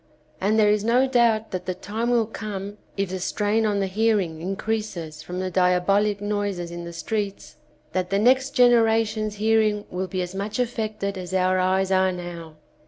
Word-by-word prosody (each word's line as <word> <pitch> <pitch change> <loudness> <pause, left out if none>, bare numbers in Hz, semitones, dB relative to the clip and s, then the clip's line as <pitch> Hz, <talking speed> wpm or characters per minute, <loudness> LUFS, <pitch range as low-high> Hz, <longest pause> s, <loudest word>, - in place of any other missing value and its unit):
And 210 +3 +2
there 210 -1 +5
is 210 -1 +1
no 240 +4 +3
doubt 235 -4 +2
that 180 -1 -5
the 185 - -1
time 220 +6 -3
will 235 -2 +3
come, 205 -2 -6 0.2
if 195 -2 -1
the 185 - -3
strain 210 +4 0
on 205 -1 0
the 195 - +1
hear 215 +3 +2
ing 160 -4 -4
increases 190 -5 -3
from 180 +3 -6
the 185 0 -2
diabohc 190 +3 +2
noises 205 -4 -2
in 170 0 -6
the 170 - -7
streets, 200 +4 -4 0.4
that 185 -1 -1
the 195 - +1
next 260 +5 +3
generation's 225 -3 +3
hear 220 +2 +3
ing 210 -1 0
will 185 +1 -3
be 185 -1 -2
as 180 +1 -7
much 200 +4 -3
affected 215 -5 -2
as 180 +1 -5
our 185 0 +2
eyes 190 +1 +1
are 190 0 +3
now. 175 -3 -7
200 Hz, 190 wpm, -24 LUFS, 185-220 Hz, 0.4 s, there